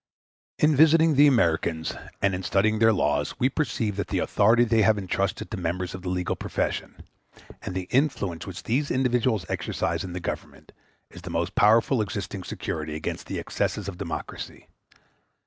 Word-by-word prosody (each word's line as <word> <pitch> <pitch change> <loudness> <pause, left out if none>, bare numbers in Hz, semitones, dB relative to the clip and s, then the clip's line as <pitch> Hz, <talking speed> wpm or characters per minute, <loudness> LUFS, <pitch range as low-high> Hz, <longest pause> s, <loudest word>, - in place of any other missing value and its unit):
In 150 0 +3
visiting 160 +2 +5
the 145 +1 +6
Americans 85 - +1 0.3
and 100 -1 +3
in 90 - -3
studying 105 +4 +1
their 110 0 +6
laws 75 -7 0
we 130 - +3
perceive 115 -8 -2
that 100 - -2
the - - -2
authority 115 +4 +3
they 115 -2 +3
have 110 0 +4
entrusted 100 0 -2
to 110 - -3
members 90 +1 -3
of 95 - -7
the 90 - -4
legal 90 -1 -1
profession, - - -3 0.6
and 95 - -6
the 95 -1 -3
influence 120 - 0
which 95 0 -7
these 140 +5 0
individuals 125 -6 +1
exercise - - -2
in 90 - -6
the 90 - -4
Government, 85 - -6 0.4
is 90 - -11
the 90 - -8
most 85 +3 -2
powerful 115 +4 +4
existing 100 -3 -4
security 80 -3 -4
against 80 - -5
the - - -4
excesses 105 -2 -2
of 90 -3 -6
democracy. - - -6
100 Hz, 170 wpm, -26 LUFS, 90-120 Hz, 0.6 s, the